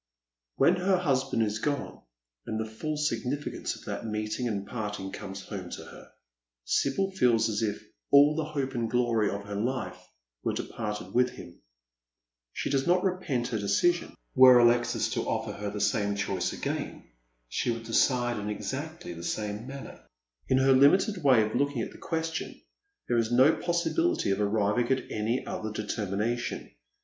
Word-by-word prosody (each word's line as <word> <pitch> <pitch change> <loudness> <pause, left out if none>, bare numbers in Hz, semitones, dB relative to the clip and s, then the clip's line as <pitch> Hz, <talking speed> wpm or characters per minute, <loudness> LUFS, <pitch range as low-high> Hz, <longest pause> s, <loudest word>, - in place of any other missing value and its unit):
When 170 +7 +4
her 185 +1 +2
husband 135 -8 +1
is 105 0 -1
gone, 145 +3 -3 0.5
and 110 - -2
the 110 - -1
full 150 +8 -4
significance 140 0 -2
of - - -14
that - - -4
meeting 110 +2 -2
and 100 -3 -2
parting 105 -4 -4
comes 95 -1 -7
home 95 -4 -7
to - - -7
her, - - -13 0.6
Sibyl 190 - +1
feels 120 -11 +3
as 110 -1 -1
if 105 -2 -1 0.3
all 145 +2 +6
the 160 - 0
hope 140 -3 -3
and 115 -3 -1
glory 115 -3 +2
of 100 0 -4
her 100 0 -6
lifo 125 +5 -2 0.5
were - - 0
departed 105 -1 -5
with 125 +1 +4
him. 85 -7 -12 0.9
She - - -3
does 135 -1 +1
not 180 +1 +3
repent 180 -10 -1
her 110 - -1
decision. 100 - +1 0.2
Were 130 -1 +9
Alexis 120 0 +3
to - - -2
offer - - -1
her 105 0 -4
the 105 +1 -5
same 100 0 +1
choice 100 0 -1
again - - -4 0.4
she - - -1
would 115 -1 -2
decide 120 +1 +2
in 105 +1 -4
exactly 140 - -5
the 85 0 -9
same 105 +5 -3
manner. 140 0 -9 0.4
In 130 - +3
her 135 0 +5
limited 180 - +4
way 130 -6 +6
of 110 0 -3
looking 140 -2 0
at - - -6
the - - -14
question 160 -1 -3 0.5
there 120 -1 +2
is 115 0 0
no 130 +6 +6
possibility 180 - 0
of 95 - 0
arriving 105 +3 +1
at 130 - -1
any 110 +4 -1
other 110 0 -4
determination. 105 +2 -3
120 Hz, 170 wpm, -28 LUFS, 105-140 Hz, 0.9 s, Were